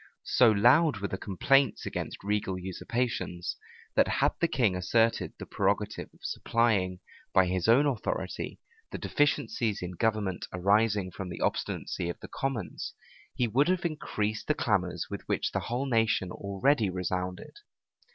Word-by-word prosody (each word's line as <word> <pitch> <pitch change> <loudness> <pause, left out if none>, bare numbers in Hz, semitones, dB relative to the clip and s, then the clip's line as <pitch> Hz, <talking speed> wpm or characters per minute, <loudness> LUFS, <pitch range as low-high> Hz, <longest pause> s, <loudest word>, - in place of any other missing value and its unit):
So 125 -2 +5
loud 120 +7 +5
were 100 0 -3
the 95 - -4
complaints 135 +8 +2
against - - -5
regal 100 -2 -1
usurpations, 95 0 -3 0.4
that - - +5
had - - +2
the 170 - +4
king 120 - +2
asserted 115 +5 +1
the - - -7
prerogative - - -1
of - - -25
supplying, 100 -6 +1 0.3
by 95 - +6
his 90 0 -1
own 125 +6 +6
authority, 130 -7 -2 0.3
the - - -5
deficiencies 115 -7 0
in 90 - -4
government 105 -1 -1
arising 100 +1 +2
from 90 +1 -6
the - - -7
obstinacy 85 - -2
of 85 - -5
the - - -10
commons, 130 -8 -4 0.4
he 125 -2 +1
would 135 +7 +3
have 185 -1 +1
increased 110 -9 -2
the 150 - +2
clamors 90 - 0
with 100 - -4
which - - 0
the - - 0
whole 125 +4 -2
nation 115 -7 +1
already 100 +5 +1
resounded. 90 - -3
105 Hz, 150 wpm, -29 LUFS, 95-120 Hz, 0.4 s, by